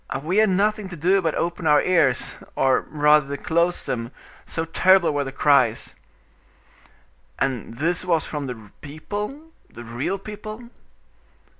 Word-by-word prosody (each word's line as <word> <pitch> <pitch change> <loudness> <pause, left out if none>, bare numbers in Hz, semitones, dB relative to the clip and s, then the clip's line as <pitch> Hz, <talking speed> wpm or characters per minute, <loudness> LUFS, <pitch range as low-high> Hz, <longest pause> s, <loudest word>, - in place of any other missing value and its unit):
"We 180 +6 -1
had 215 -1 +5
nothing 205 +1 +1
to 175 - -7
do 185 +5 +2
but 160 -3 -1
open 170 -1 -2
our 150 -1 +6
ears, 155 -8 +1 0.2
or 135 -1 +2
rather 150 -2 +3
to - - -18
close 170 +2 +1
them, 115 0 -4 0.3
so 160 - -2
terrible 185 +1 +4
were 145 0 0
the 135 - -6
cries." 135 -5 +2 1.4
"And 125 -4 -2
this 165 +7 -1
was 170 -3 +1
from 145 -3 -4
the 110 -5 -8
people, 210 - -6 0.2
the 120 - -11
real 120 +11 -3
people?" 215 +3 -9
160 Hz, 145 wpm, -23 LUFS, 140-190 Hz, 1.4 s, our